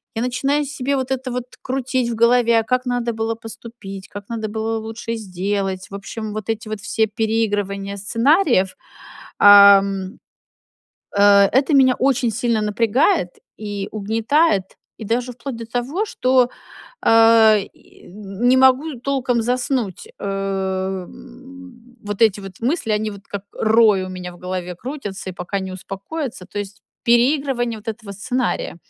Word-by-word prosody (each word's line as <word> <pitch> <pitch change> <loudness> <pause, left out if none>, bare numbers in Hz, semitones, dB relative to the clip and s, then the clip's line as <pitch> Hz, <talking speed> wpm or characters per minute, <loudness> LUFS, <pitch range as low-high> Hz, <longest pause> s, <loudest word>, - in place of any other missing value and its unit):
я 225 - -2
начинаю 275 +4 0
себе 280 0 -2
вот 260 0 -3
это 260 0 -2
вот 250 0 -3 0.2
крутить 255 -2 -1
в - - -3
голове: 235 0 +4
а - - -1
как 255 +2 -1
надо 240 -1 -1
было 225 +1 -2
поступить, 225 -4 -10
как 205 +1 -10
надо 220 -2 -4
было 225 +1 -2
лучше 225 +1 -6
сделать? 195 -1 -3
В - - -6
общем, 210 +2 -6
вот 215 0 -6
эти 220 0 -3
вот 215 -2 -5
все 220 +2 +1
переигрывания 205 -2 -1
сценариев, 230 - +2 0.6
ам, 200 0 +6 1.0
э, - - +4 0.3
это 275 +4 +2
меня 260 -2 +5
очень 260 -2 +1
сильно 230 -1 0
напрягает 225 - +1 0.3
и 205 -2 -5
угнетает, 220 - +1 0.3
и 220 - -8
даже 245 +3 -1
вплоть 250 +1 -7
до 230 - -7
того, 260 - -2
что, 255 - +2 0.5
а, 225 -1 +6
и 200 - -12
не 210 +6 0
могу 265 +3 +4
толком 250 -3 0
заснуть. 245 - -2
Э, - - -4 0.8
м, 255 -1 -14
вот 205 +1 -3
эти 205 -2 +4
вот 195 +1 -11
мысли, 250 -1 -1
они 215 0 -1
вот 200 -1 -12
как 200 -1 -6
рой 215 -3 +3
у - - -7
меня 180 -1 -7
в - - -16
голове 180 -1 -5
крутятся 210 -6 -6
и - - -9
пока 180 +3 -4
не 190 0 -6
успокоятся, 195 - -6
то 205 - -7
есть 200 0 -7 0.2
переигрывание 240 -1 +2
вот 215 - -12
этого 220 -2 -6
сценария. 245 -2 -2
225 Hz, 150 wpm, -20 LUFS, 200-250 Hz, 1.0 s, ам